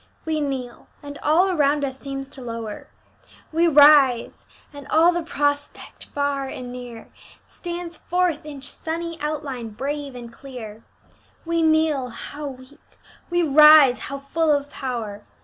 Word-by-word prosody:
We 315 -1 -1
kneel, 260 -4 -5 0.2
and 285 0 -9
all 350 +6 +3
around 290 -3 +2
us 265 -1 -6
seems 275 0 -6
to 275 - -12
lower; 230 -3 -6 0.6
We 330 +2 +3
rise, 285 -5 +5 0.3
and 285 -1 -10
all 330 +4 +5
the 345 0 -2
prospect, 290 -3 -3
far 285 -1 -2
and 250 -2 -7
near, 245 -2 -9 0.4
Stands 345 -1 -7
forth 355 -3 -1
in 290 -3 -9
sunny 335 +2 -5
outline 285 -6 -4
brave 280 +4 -5
and 235 -1 -9
clear. 230 -5 -10 0.6
We 335 0 0
kneel 315 -5 +2
how 290 +5 -7
weak! 260 +1 -13 0.3
we 350 0 +1
rise 300 -3 +7
how 275 - -6
full 315 +4 -1
of 285 -1 0
power! 225 -6 -5
285 Hz, 140 wpm, -23 LUFS, 255-315 Hz, 0.6 s, rise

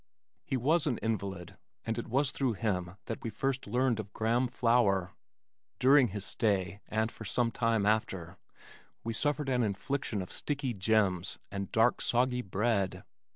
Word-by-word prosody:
He 135 - -1
was 155 +6 +2
an 125 -6 +1
invalid, 100 -6 -4 0.3
and 115 +1 -1
it - - -5
was 135 +4 +1
through 130 -4 0
him 95 -4 -2
that 115 - -5
we 115 - -3
first 135 +4 -2
learned 125 +1 +1
of 105 -1 -6
graham 120 +3 +1
flour. 115 -7 +2 0.7
During 135 0 +6
his 105 -1 -4
stay 100 -2 0
(and 110 +1 0
for - - -10
some 115 +3 0
time 115 -4 +1
after) 95 -5 -1 0.6
we 115 - -2
suffered 145 +5 0
an 125 -2 +2
infliction 105 0 -1
of 90 - -11
sticky 140 -4 -2
"gems" 95 -3 +1
and 100 -1 -4
dark 115 +2 +3
soggy 125 +1 +2
bread. 100 -1 0
115 Hz, 155 wpm, -31 LUFS, 100-125 Hz, 0.7 s, During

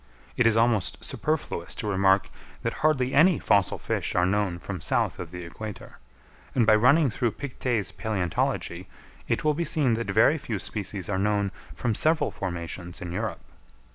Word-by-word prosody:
It 120 - +4
is 110 -1 +3
almost 115 -5 +1
superfluous 150 - -2
to - - -5
remark 95 0 +3 0.3
that 115 - -1
hardly 135 -4 +2
any 160 +3 +5
fossil 100 -3 +2
fish - - -3
are 90 - +3
known 95 -2 0
from 90 0 -6
south - - 0
of 90 - -6
the 90 +1 -7
equator; 105 +4 -9 0.6
and 120 -4 +4
by 110 - +6
running 130 +6 +5
through 115 0 -1
Pictet's 125 -5 -2
Palæontology 95 -3 -2 0.4
it - - 0
will 155 0 +3
be 170 +3 -1
seen 150 -8 +2
that 115 -2 -2
very 110 +10 +4
few 110 -5 -3
species 100 -1 -4
are 95 -2 -1
known 100 -1 +1 0.2
from 120 -3 -1
several 160 +8 +3
formations 85 -1 -5
in 90 -1 -6
Europe. 105 +4 -3
105 Hz, 170 wpm, -26 LUFS, 95-125 Hz, 0.6 s, by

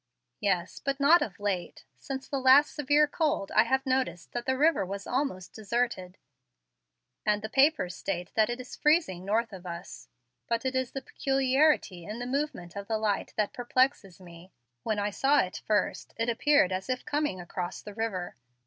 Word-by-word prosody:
"Yes, 185 -4 -1
but 275 0 -2
not 315 +5 +6
of 200 -1 -4
late. 190 -4 -3 0.2
Since 270 -1 -6
the 275 - -2
last 265 +3 +6
severe 295 +1 +3
cold 295 -8 -1
I 220 - +5
have 265 +3 0
noticed 255 -10 -1
that 240 0 -5
the 260 0 +1
river 310 -5 +3
was 195 +1 -6
almost 245 -9 -2
deserted, 220 -4 -2 1.1
and 210 -1 +1
the 220 - -4
papers 270 - +3
state 180 -2 -4
that 220 0 +3
it 240 +1 -3
is 255 - -8
freezing 300 - +2
north 220 +3 0
of 185 -1 -9
us. 170 -1 -8 0.4
But 235 +1 -1
it 260 - 0
is 260 -1 -1
the 270 - -5
peculiarity 270 - +1
in 210 +6 -6
the 245 - -5
movement 255 - -3
of 200 0 -6
the 220 - 0
light 215 -2 -1
that 210 +2 0
perplexes 245 - 0
me. 175 0 -14 0.3
When 215 - -1
I 205 0 -1
saw 280 +7 +3
it 185 - -5
first, 210 -2 -1
it 230 +1 0
appeared 235 -4 +3
as 185 +4 -3
if 255 0 -2
coming 295 -10 -1
across 175 0 -5
the 210 - -9
river. 200 -5 -3
230 Hz, 185 wpm, -29 LUFS, 190-270 Hz, 1.1 s, not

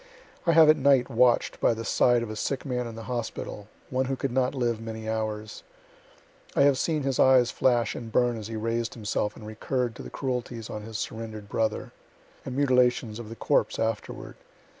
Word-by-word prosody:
I 170 - +5
have 160 -1 +8
at 155 +1 +6
night 135 -2 +3
watch'd 120 0 +3
by 115 - +3
the 115 0 -6
side 120 +1 +3
of 110 - -5
a - - -5
sick 135 +6 -2
man 125 -3 -2
in 115 - -8
the 115 - -8
hospital, 115 -4 -5 0.2
one 130 +1 +1
who 135 +1 -1
could 135 0 -3
not 130 +2 +1
live 120 -3 0
many 110 -1 -6
hours. 110 -1 -3 0.9
I - - +5
have 140 -2 +4
seen 155 -3 0
his 135 -2 -1
eyes 130 -2 +5
flash 120 -2 +2
and 115 -2 -7
burn 120 +1 +2
as 110 -2 -6
he 115 - -6
raised 115 +1 -2
himself 105 -2 -2
and 110 - -11
recurr'd 120 +3 -2
to - - -7
the - - -8
cruelties 125 -4 -4
on 105 - -5
his 110 0 -6
surrender'd 110 -2 -6
brother, 110 0 -1 0.5
and 130 - -6
mutilations 125 -5 +2
of 115 -2 -8
the 115 - -7
corpse - - +1
afterward. 110 -1 -3
120 Hz, 200 wpm, -27 LUFS, 110-130 Hz, 0.9 s, have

